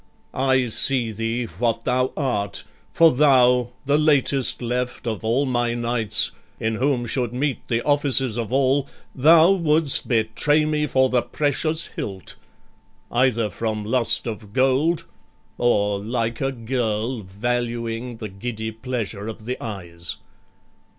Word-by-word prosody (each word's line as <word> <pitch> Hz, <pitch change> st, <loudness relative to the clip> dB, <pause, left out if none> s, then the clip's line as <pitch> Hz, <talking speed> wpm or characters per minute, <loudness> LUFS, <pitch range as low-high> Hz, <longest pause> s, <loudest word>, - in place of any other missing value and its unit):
I 130 Hz, -1 st, +2 dB
see 120 Hz, 0 st, +1 dB
thee 115 Hz, +3 st, -2 dB
what 115 Hz, 0 st, -2 dB
thou 125 Hz, +1 st, +1 dB
art, 105 Hz, -8 st, -2 dB, 0.3 s
For 165 Hz, -1 st, +5 dB
thou, 125 Hz, -3 st, +4 dB, 0.2 s
the 145 Hz, +2 st, +2 dB
latest 140 Hz, -3 st, +2 dB
left 125 Hz, +1 st, -3 dB
of 110 Hz, -3 st, -3 dB
all 120 Hz, +6 st, +1 dB
my 120 Hz, -2 st, 0 dB
knights, 120 Hz, -2 st, +1 dB, 0.3 s
In 110 Hz, 0 st, -1 dB
whom 130 Hz, -1 st, 0 dB
should 120 Hz, 0 st, -2 dB
meet 140 Hz, 0 st, -2 dB
the 115 Hz, 0 st, -1 dB
offices 140 Hz, -5 st, +1 dB
of 115 Hz, -1 st, -3 dB
all, 135 Hz, +1 st, +2 dB, 0.3 s
Thou 160 Hz, +6 st, +6 dB
wouldst 160 Hz, -5 st, +3 dB
betray 125 Hz, +7 st, +2 dB
me 150 Hz, 0 st, 0 dB
for 130 Hz, -1 st, +2 dB
the 125 Hz, -1 st, +3 dB
precious 155 Hz, +4 st, -1 dB
hilt; 95 Hz, -3 st, -7 dB, 0.8 s
Either 120 Hz, -4 st, +1 dB
from 110 Hz, 0 st, -3 dB
lust 120 Hz, +1 st, +3 dB
of 105 Hz, -3 st, -7 dB
gold, 135 Hz, +6 st, +2 dB, 0.5 s
or 105 Hz, -4 st, +2 dB
like 115 Hz, +2 st, -3 dB
a 135 Hz, 0 st, 0 dB
girl 115 Hz, -1 st, -2 dB
Valuing 115 Hz, +3 st, -3 dB
the 110 Hz, -2 st, -6 dB
giddy 110 Hz, +3 st, -5 dB
pleasure 110 Hz, -3 st, -5 dB
of 110 Hz, -1 st, -8 dB
the 125 Hz, +2 st, -4 dB
eyes. 85 Hz, -6 st, -5 dB
120 Hz, 135 wpm, -22 LUFS, 110-135 Hz, 0.8 s, Thou